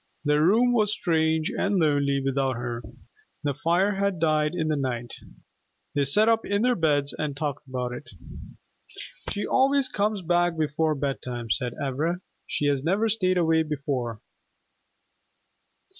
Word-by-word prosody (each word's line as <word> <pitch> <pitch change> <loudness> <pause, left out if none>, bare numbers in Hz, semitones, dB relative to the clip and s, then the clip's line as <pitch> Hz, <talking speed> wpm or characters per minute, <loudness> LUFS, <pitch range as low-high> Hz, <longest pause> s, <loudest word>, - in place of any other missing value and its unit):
The 150 0 +3
room 230 +9 +4
was 215 -3 +2
strange 160 -5 +1
and 200 0 0
lonely 145 -4 +2
without 135 -1 0
her. 120 0 -4 0.6
The 145 -1 0
fire 175 +7 +1
had 200 -1 0
died 155 0 +1
in 160 -3 -1
the 155 - +1
night. 125 -4 -3 0.8
They 145 -1 +1
sat 210 +11 +3
up 225 0 +3
in 200 +2 0
their 250 0 +4
beds 145 -6 +1
and 145 -3 -3
talked 145 -2 -4
about 125 -1 -3
it. 125 +4 -9 1.2
"She 205 - -2
always 270 0 +3
comes 210 -3 -1
back 175 0 +1
before 155 0 0
bedtime," 125 -4 -4
said 125 -1 0
Ivra. 150 +6 -1 0.3
"She 145 - -2
has 140 -2 +1
never 195 +7 +1
stayed 185 -4 +1
away 160 -2 +3
before." 135 -7 -3
155 Hz, 145 wpm, -26 LUFS, 140-185 Hz, 1.2 s, room